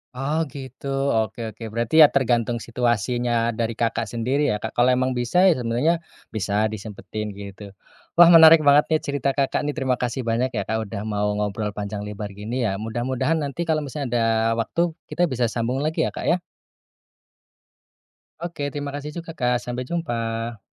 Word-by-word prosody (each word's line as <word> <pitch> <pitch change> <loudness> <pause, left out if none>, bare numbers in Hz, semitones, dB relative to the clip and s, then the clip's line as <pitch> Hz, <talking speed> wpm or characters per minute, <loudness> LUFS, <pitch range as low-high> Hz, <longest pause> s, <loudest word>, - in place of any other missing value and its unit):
Oh 145 +5 0
gitu, 135 0 -8 0.3
oke 110 +1 -1 0.2
oke. 115 - -10
Berarti 115 +5 -2
ya - - +9
tergantung 120 -3 +1
situasinya 120 +1 -1 0.3
dari 115 0 0
Kakak 115 0 0
sendiri 125 +5 0
ya 105 - -1
Kak, 110 - -6
kalau 120 +1 +4
emang 130 +1 +1
bisa 120 +8 +1
ya 180 - +5
sebenarnya 130 +8 0 0.3
bisa 105 +1 +1
disempetin 105 0 -6
gitu, 100 0 -9 0.5
wah 175 - +10
menarik 160 0 +9
banget 145 +1 +7
nih 155 - +4
cerita 140 -1 0
Kakak 140 +1 0
nih 150 - -1
terima 130 -3 0
kasih 125 0 -3
banyak 120 +3 +1
ya 105 -4 -2
Kak 110 +1 -1
udah 100 -1 -6
mau 105 -1 0
ngobrol 105 0 -2
panjang 105 0 -5
lebar 105 0 -5
gini 105 +4 -5
ya, 95 - -1
mudah-mudahan 125 +7 -1
nanti 145 +2 -3
kalau 160 -2 +1
misalnya 145 -1 -4
ada 120 -1 +2 0.4
waktu, 170 +9 0 0.2
kita 175 -3 0
bisa 125 -2 +1
sambung 120 +3 -2
lagi 155 +3 0
ya - - -1
Kak - - -5
ya. 175 +1 +2 2.0
Oke 165 -4 -4
terima 145 0 -4
kasih 145 +1 -5
juga 165 0 -8
Kak 125 -4 +1
sampai 125 +1 -4
jumpa. 115 -8 -3
120 Hz, 175 wpm, -23 LUFS, 110-145 Hz, 2.0 s, wah